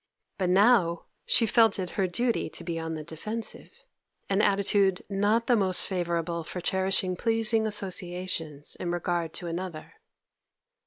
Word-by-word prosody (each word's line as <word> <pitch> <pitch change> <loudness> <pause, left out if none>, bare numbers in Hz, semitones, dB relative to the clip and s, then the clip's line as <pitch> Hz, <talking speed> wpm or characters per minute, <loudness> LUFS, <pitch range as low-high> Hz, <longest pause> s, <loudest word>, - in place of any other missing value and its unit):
But 185 -2 +1
now 190 -3 +4 0.2
she 230 - +3
felt 225 -1 +4
it 185 -2 -4
her 195 -2 0
duty 235 +7 0
to - - -7
be 165 -1 -3
on 160 0 -4
the 155 - -6
defensive, 210 +9 -5 0.5
an 195 +1 +3
attitude 195 -2 +2
not 205 +4 +2
the 245 - +3
most 190 -4 +3
favourable 170 -2 -2
for 180 - -6
cherishing 190 0 0
pleasing 225 +1 +2
associations 180 -6 -1
in 175 - -4
regard 175 -1 -1
to 175 - -6
another. 170 -1 -6
185 Hz, 145 wpm, -27 LUFS, 170-205 Hz, 0.5 s, now